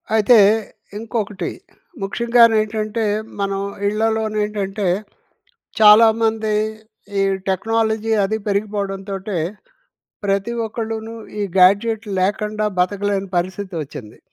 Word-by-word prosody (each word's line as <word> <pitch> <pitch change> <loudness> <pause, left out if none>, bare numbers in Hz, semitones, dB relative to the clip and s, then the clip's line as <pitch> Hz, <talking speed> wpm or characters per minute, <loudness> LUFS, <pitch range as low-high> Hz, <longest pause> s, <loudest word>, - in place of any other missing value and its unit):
అయితే, 220 +2 +5 0.6
ఇంకొకటి 210 -5 -3 0.5
ముఖ్యంగానేంటంటే, 220 0 +2 0.3
మనం 195 0 -1 0.3
ఇళ్లలోనేంటంటే 210 -2 -1 0.9
చాలామంది 220 0 +5 0.7
ఈ - - +3 0.3
టెక్నాలజీ 220 +3 0
అది 220 +3 -1
పెరిగిపోవడంతోటే 200 -1 -3 0.9
ప్రతి 200 +3 0
ఒక్కళ్ళును 225 0 -5 0.3
ఈ - - 0 0.2
గ్యాడ్జెట్ 205 +4 +4
లేకండా 210 +3 -1
బతకలేని 195 +1 0
పరిస్థితి 185 +2 -3
వచ్చింది. 120 -6 -10
210 Hz, 75 wpm, -20 LUFS, 195-220 Hz, 0.9 s, అయితే